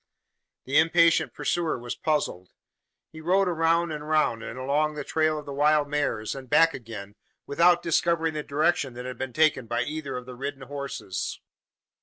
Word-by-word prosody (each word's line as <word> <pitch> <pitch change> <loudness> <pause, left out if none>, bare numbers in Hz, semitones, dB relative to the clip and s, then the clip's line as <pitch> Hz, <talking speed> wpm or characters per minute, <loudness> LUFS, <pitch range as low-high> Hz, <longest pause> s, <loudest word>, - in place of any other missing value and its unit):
The 135 +3 +3
impatient 165 +1 +4
pursuer 170 -5 -1
was 120 0 -5
puzzled. 145 - -2 0.6
He 160 - -10
rode 190 +4 +2
round 165 0 +1
and 150 0 -6
round, 155 -7 +2
and 120 - -7
along 145 +4 0
the 150 - -4
trail 155 +1 +1
of 150 - -7
the 140 - -6
wild 150 +1 +3
mares, 145 -7 -1
and 135 -2 -9
back 165 +4 +5
again, 110 -5 -8 0.3
without 170 +4 +3
discovering 165 -1 +1
the 150 - -3
direction 145 -3 0
that 125 +1 -7
had 125 -2 -7
been 130 -1 -3
taken 155 -4 +2
by - - 0
either 145 -3 -4
of 125 - -7
the 125 - -9
ridden 135 +2 -6
horses. 140 -9 -5
150 Hz, 175 wpm, -26 LUFS, 130-160 Hz, 0.6 s, back